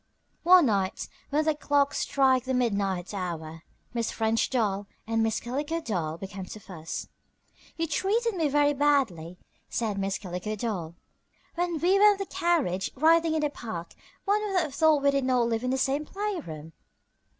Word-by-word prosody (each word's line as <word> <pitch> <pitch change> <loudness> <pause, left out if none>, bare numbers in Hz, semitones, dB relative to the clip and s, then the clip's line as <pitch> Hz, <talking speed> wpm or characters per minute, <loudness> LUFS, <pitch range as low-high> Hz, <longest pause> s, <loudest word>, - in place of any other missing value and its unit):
One 360 -1 +7
night 195 -5 0 0.2
when 300 +2 +1
the 315 - +3
clock 285 -1 +1
struck 260 -2 +2
the 260 0 0
midnight 200 -6 0
hour 165 -4 -5 0.3
Miss 230 -2 -1
French 225 0 0
Doll 205 -5 0 0.2
and 225 0 0
Miss 225 -1 +1
Calico 290 +7 -3
Doll 175 - -3
began 195 +1 -7
to 215 - -9
fuss. 165 -5 -7 0.7
"You 330 - 0
treated 425 +9 0
me 330 -5 +1
very 290 0 +3
badly," 260 - +1 0.3
said 215 -4 -2
Miss 195 0 -1
Calico 180 +3 -5
Doll. 190 -7 -4 0.6
"When 345 -1 -1
we 365 +5 +3
were 420 0 +7
in - - -8
the 395 - -3
carriage 335 - 0
riding 325 +3 +4
in 315 - +1
the 295 -1 0
park 175 -11 -7 0.3
one 415 +1 +2
would 395 -3 +1
have 305 -4 -4
thought 310 -1 +3
we 280 - +5
did 275 -1 0
not 250 -2 +2
live 225 0 -1
in 250 - -1
the 265 - +1
same 275 +3 0
playroom." 300 - -5
255 Hz, 175 wpm, -27 LUFS, 195-315 Hz, 0.7 s, One